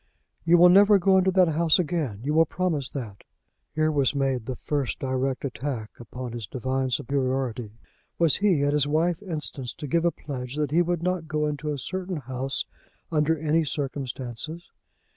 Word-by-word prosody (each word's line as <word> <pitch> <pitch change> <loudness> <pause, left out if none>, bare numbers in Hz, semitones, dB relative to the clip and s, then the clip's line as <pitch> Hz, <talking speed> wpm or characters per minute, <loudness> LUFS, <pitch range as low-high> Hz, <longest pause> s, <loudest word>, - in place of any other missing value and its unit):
"You 170 +1 +6
will 175 +1 +8
never 200 +3 +7
go 190 +1 +4
into 190 0 +2
the 185 -3 +4
house 160 0 +4
again! 155 - -2
You 150 +3 -1
will 165 0 +4
promise 160 -8 -1
that!" 110 -8 -7 0.5
Here 155 0 +2
was 140 -2 +1
made 135 -4 0
the 130 - -3
first 140 0 -2
direct 130 0 -2
attack 125 -4 -4
upon 120 +1 -7
his 115 -3 -6
divine 130 +3 -2
superiority! 130 -3 -1 0.4
Was 165 -3 +4
he, 190 -8 +2
at 145 0 +2
his 145 -1 +2
wife's 165 +4 +1
instance, 150 - -5
to - - -7
give 165 +4 +1
a 170 - +4
pledge 130 -5 -6
that 150 -2 -1
he 170 +3 +4
would 175 -1 -1
not 180 -2 -1
go 155 0 0
into 150 0 -2
a 145 - -3
certain 185 +5 -4
house 130 0 -3 0.5
under 160 0 +2
any 160 +2 +1
circumstances? 135 +2 -5
145 Hz, 180 wpm, -26 LUFS, 130-165 Hz, 0.5 s, will